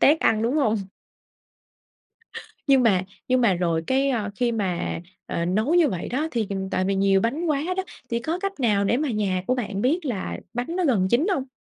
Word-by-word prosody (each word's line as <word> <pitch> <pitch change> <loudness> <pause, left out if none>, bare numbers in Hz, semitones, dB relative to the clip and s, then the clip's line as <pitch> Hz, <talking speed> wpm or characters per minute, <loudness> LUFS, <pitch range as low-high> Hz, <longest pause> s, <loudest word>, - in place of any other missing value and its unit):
tét 305 +3 +5
ăn, 220 0 +2
đúng 240 +5 +1
hông? 225 -7 +2 1.9
Nhưng 270 -3 +5
mà 195 -6 +3 0.2
nhưng 255 0 +3
mà 210 -6 +4
rồi 165 -2 0
cái, 270 +1 +2
ơ, 215 -5 -1
khi 240 +1 +1
mà, 190 -7 -2 0.3
ờ, 170 - -2
nấu 215 - +1
như 345 -4 +5
vậy 180 -8 -4
đó 300 +6 -1
thì 225 -6 -1 0.2
tại 185 0 0
vì 195 - +1
nhiều 195 0 +3
bánh 280 - -1
quá 295 -3 +1
đó, 380 - 0 0.3
thì 235 - +1
có 320 +8 -2
cách 395 -4 -4
nào 210 -5 +2
để 230 - +2
mà 295 +1 -1
nhà 195 -5 0
của 255 - +2
bạn 215 -5 -3
biết 315 +7 +1
là 225 -9 -3 0.2
bánh 250 +9 -3
nó 365 - +1
gần 205 -10 +2
chín 280 +10 +3
hông? 265 - -3
235 Hz, 210 wpm, -24 LUFS, 195-275 Hz, 1.9 s, tét